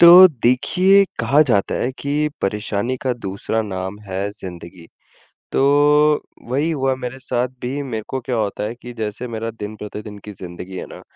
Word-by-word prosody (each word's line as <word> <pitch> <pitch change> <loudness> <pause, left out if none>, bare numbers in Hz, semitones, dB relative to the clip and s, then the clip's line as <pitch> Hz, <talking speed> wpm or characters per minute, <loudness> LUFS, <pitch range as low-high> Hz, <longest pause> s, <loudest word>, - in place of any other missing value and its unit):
तो 175 +2 +11 0.2
देखिए, 180 +11 +5 0.2
कहा 145 +2 +4
जाता 110 -9 +1
है 125 - 0
कि 145 +2 0
परेशानी 105 +4 -1
का 130 - +1
दूसरा 110 -1 -3
नाम 95 -1 -4
है 95 +2 -2
ज़िंदगी। 90 -4 -10 0.7
तो - - +2 0.9
वही 140 +6 +1
हुआ 135 -4 +1
मेरे 130 0 -6
साथ 125 -1 -1
भी 135 +4 -2
मेरे 115 -6 -4
को 130 - -2
क्या 120 0 -2
होता 105 -1 -1
है 110 +2 -3
कि 120 - -7
जैसे 110 +3 -3
मेरा 115 0 -3
दिन-प्रतिदिन 105 -1 -7
की 105 - -7
ज़िंदगी 90 0 -8
है - - -5
ना, - - -10
115 Hz, 165 wpm, -20 LUFS, 100-130 Hz, 0.9 s, तो